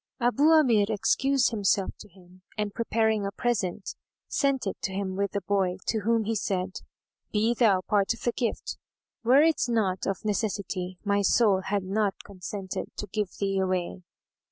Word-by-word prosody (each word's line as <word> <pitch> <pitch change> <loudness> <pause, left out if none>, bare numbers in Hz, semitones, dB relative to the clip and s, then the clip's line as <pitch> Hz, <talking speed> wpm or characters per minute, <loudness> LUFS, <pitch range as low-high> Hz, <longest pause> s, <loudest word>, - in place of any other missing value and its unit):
Abu 245 +4 +2
Amir 250 -11 +5
excused 265 +5 +2
himself 200 -2 +1
to 210 - -12
him 185 0 -20 0.2
and 210 -1 -2
preparing 220 -2 +1
a 200 - -2
present, 205 -4 -2 0.3
sent 275 -3 0
it 195 - -2
to - - -2
him 190 -1 -3
with 200 0 -1
the 200 - -1
boy, 190 -1 0
to 220 - 0
whom 225 +2 +1
he 225 +2 -1
said, 190 -3 -2 0.5
"Be 220 +2 +2
thou 215 -6 +3
part 200 0 +1
of - - -17
the 240 - +1
gift: 235 -1 -3 0.4
were 260 +5 +6
it 320 -2 +2
not 210 -6 0
of 195 +2 -3
necessity, 200 -4 -2
my 200 -1 +1
soul 200 -1 +3
had 200 0 0
not 195 +1 -1
consented 190 0 -6
to - - -3
give 210 -3 -1
thee 195 -1 0
away." 185 -1 -1
205 Hz, 170 wpm, -27 LUFS, 190-225 Hz, 0.5 s, were